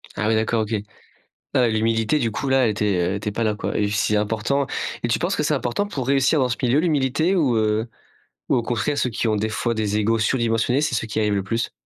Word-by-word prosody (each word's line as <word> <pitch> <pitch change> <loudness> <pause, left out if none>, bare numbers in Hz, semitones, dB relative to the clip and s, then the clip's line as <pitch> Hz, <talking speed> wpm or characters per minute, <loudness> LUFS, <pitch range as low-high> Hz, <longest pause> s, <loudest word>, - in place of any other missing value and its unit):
Ah, 105 - -1
oui, 110 - +3
d'accord, 110 +1 +1
OK. 110 +1 -3 0.6
Heu, 125 -2 0
l'humilité, 115 +5 +1
du 115 -4 0
coup, 135 +6 -3
là, 135 0 +4
elle 110 - +2
était 105 -1 0
elle 90 +1 0
était 105 +1 -3
pas 115 +3 -2
là, 105 -1 +1
quoi - - -3
et 105 -1 +1
c'est 105 +1 +1
important. 110 +7 0 0.4
Et - - +1
tu - - +1
penses - - 0
que - - -1
c'est - - +1
important 125 +12 -1
pour 135 -11 -4
réussir 135 +2 +3
dans 130 -2 +2
ce 120 - -2
milieu, 130 +2 +3
l'humilité? 155 +2 +1
Ou 135 -9 +2
heu 110 +1 +1 0.6
ou - - +3
au - - +1
contraire, 125 +5 -1
ceux 125 - +1
qui 115 +1 -2
ont, 110 - +2
des 110 +1 -1
fois, 115 +2 -1
des 105 -2 -1
égos 110 +2 +1
surdimensionnés, 115 +2 +1
c'est 150 -5 0
ceux 115 - -2
qui 105 - -5
y - - +1
arrivent 105 -1 +1
le 100 - -1
plus? 115 +4 -2
115 Hz, 260 wpm, -22 LUFS, 105-130 Hz, 0.6 s, là